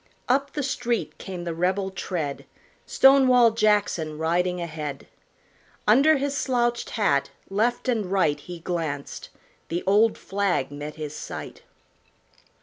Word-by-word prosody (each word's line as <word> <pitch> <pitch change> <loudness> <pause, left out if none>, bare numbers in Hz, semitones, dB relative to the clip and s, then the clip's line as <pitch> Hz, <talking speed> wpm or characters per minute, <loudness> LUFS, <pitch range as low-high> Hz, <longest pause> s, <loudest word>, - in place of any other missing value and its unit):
Up 275 +2 +1
the 295 - -2
street 240 -3 -2
came 185 -3 -6
the 170 -1 -3
rebel 190 +3 0
tread, 160 -7 -4 0.4
Stonewall 255 -3 +6
Jackson 205 -8 +1
riding 175 +3 0
ahead. 155 -4 -5 0.8
Under 280 +8 +6
his 280 +1 -2
slouched 240 -3 0
hat 140 -10 +2 0.2
left 235 +6 0
and 225 -6 0
right 160 -7 +2
He 175 +4 -9
glanced; 160 -5 -4 0.4
the 170 +2 -3
old 210 +3 +4
flag 195 -8 -1
met 145 +1 -7
his 155 -1 -6
sight. - - -7
195 Hz, 125 wpm, -25 LUFS, 160-240 Hz, 0.8 s, Stonewall